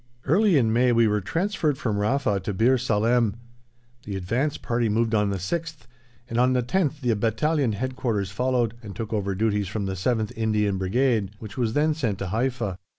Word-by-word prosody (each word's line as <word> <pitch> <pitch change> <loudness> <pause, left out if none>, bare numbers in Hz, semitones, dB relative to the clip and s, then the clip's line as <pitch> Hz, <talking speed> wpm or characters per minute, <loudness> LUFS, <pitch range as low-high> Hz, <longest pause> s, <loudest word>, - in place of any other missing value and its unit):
Early 185 +4 +4
in 110 -4 +2
May 125 +1 +3
we 115 -1 +4
were 105 0 +1
transferred 165 - -1
from 105 -5 -1
Rafa 105 -2 +1
to 100 +2 -4
Bir 125 +6 +3
Salem. 115 -1 +2 0.7
The 100 - -5
advance 120 +11 -1
party 120 -1 -1
moved 115 +1 +1
on 105 -2 +2
the 100 - -1
6th, 160 - -4 0.5
and 115 -1 -2
on 125 +1 +4
the 125 -1 +1
10th 150 +2 0
the 120 -3 +1
Battalion 115 +4 +1
Headquarters 115 -4 -2
followed, 120 +1 0
and 100 -4 -9
took 110 +3 -5
over 100 -2 -1
duties 105 -1 0
from 100 +2 -3
the 95 - -2
7th 110 +3 -1
Indian 110 -2 +1
Infantry - - -2
Brigade, 110 +1 +1
which 105 -2 -9
was 115 -3 -1
then 155 +3 +2
sent 120 -10 -2
to 95 - -4
Haifa. 115 -3 -1
115 Hz, 195 wpm, -25 LUFS, 105-130 Hz, 0.7 s, Early